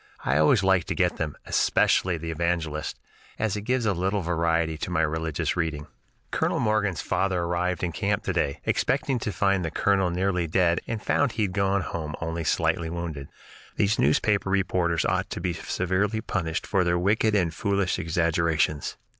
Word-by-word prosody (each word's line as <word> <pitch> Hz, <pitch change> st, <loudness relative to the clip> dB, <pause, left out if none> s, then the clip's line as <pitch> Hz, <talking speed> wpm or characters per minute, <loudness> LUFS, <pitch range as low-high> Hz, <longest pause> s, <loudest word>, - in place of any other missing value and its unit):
I 70 Hz, +3 st, +2 dB
always 85 Hz, +7 st, +4 dB
like 95 Hz, -3 st, +3 dB
to -, -, -3 dB
get 90 Hz, -3 st, +1 dB
them, 75 Hz, -3 st, -3 dB
especially 90 Hz, -2 st, +2 dB
the 80 Hz, +1 st, -5 dB
'Evangelist,' 80 Hz, -2 st, -2 dB, 0.4 s
as 110 Hz, -3 st, 0 dB
it 105 Hz, -, -3 dB
gives 125 Hz, -2 st, +1 dB
a 105 Hz, -, +2 dB
little 95 Hz, +3 st, 0 dB
variety 85 Hz, -1 st, +1 dB
to -, -, -3 dB
my 90 Hz, -2 st, +1 dB
religious 80 Hz, 0 st, -1 dB
reading. 80 Hz, -4 st, -2 dB, 0.5 s
"Colonel -, -, 0 dB
Morgan's 105 Hz, -6 st, 0 dB
father 95 Hz, -3 st, 0 dB
arrived 90 Hz, +1 st, -1 dB
in 90 Hz, -, 0 dB
camp 100 Hz, +5 st, -1 dB
to 95 Hz, -, -1 dB
day, 70 Hz, -5 st, -1 dB
expecting 135 Hz, -2 st, 0 dB
to 105 Hz, -, -3 dB
find 95 Hz, -2 st, +1 dB
the 80 Hz, -, -1 dB
colonel 95 Hz, +2 st, +2 dB
nearly 90 Hz, -1 st, 0 dB
dead, 85 Hz, +1 st, +2 dB
and 115 Hz, -2 st, -4 dB
found 145 Hz, -4 st, +1 dB
he 110 Hz, -, 0 dB
had 95 Hz, -3 st, -1 dB
gone 100 Hz, 0 st, +1 dB
home 80 Hz, -4 st, -4 dB
only 80 Hz, 0 st, -3 dB
slightly 80 Hz, +1 st, 0 dB
wounded. 80 Hz, -5 st, -5 dB, 0.5 s
These 105 Hz, +2 st, +1 dB
newspaper 95 Hz, +8 st, +2 dB
reporters 90 Hz, -3 st, +1 dB
ought -, -, 0 dB
to -, -, -5 dB
be 90 Hz, -, -1 dB
severely 95 Hz, +6 st, -1 dB
punished 85 Hz, -6 st, -2 dB
for 95 Hz, -3 st, +1 dB
their 85 Hz, 0 st, +1 dB
wicked 105 Hz, +4 st, +2 dB
and 90 Hz, -5 st, +1 dB
foolish 100 Hz, +2 st, 0 dB
exaggerations. 80 Hz, -2 st, 0 dB
90 Hz, 180 wpm, -26 LUFS, 80-100 Hz, 0.5 s, always